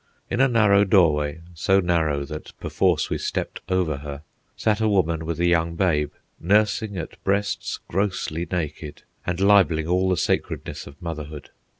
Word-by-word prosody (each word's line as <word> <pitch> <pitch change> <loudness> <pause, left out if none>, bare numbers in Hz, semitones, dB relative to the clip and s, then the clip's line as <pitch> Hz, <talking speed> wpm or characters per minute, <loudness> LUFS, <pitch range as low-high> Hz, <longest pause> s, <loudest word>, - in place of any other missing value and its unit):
In 120 - +1
a 135 - +6
narrow 105 -5 +4
doorway, 80 -6 +2
so 95 +4 +2
narrow 80 -6 +1
that 75 +1 -9
perforce - - +1
we - - -1
stepped - - -3
over 90 -6 +1
her, 70 +1 -8 0.3
sat 110 0 +1
a 110 - +3
woman 85 -5 +1
with 85 -1 -3
a 85 - +2
young 85 -1 +2
babe, 75 -5 +1 0.3
nursing 105 +2 +1
at 80 - -7
breasts 100 +1 -1
grossly 90 -3 -2
naked 80 -3 -4 0.2
and 90 0 -1
libelling 95 -6 +4
all 90 +2 +2
the 90 - +1
sacredness - - -2
of 70 +3 -13
motherhood. 75 -3 -6
85 Hz, 160 wpm, -24 LUFS, 80-100 Hz, 0.3 s, a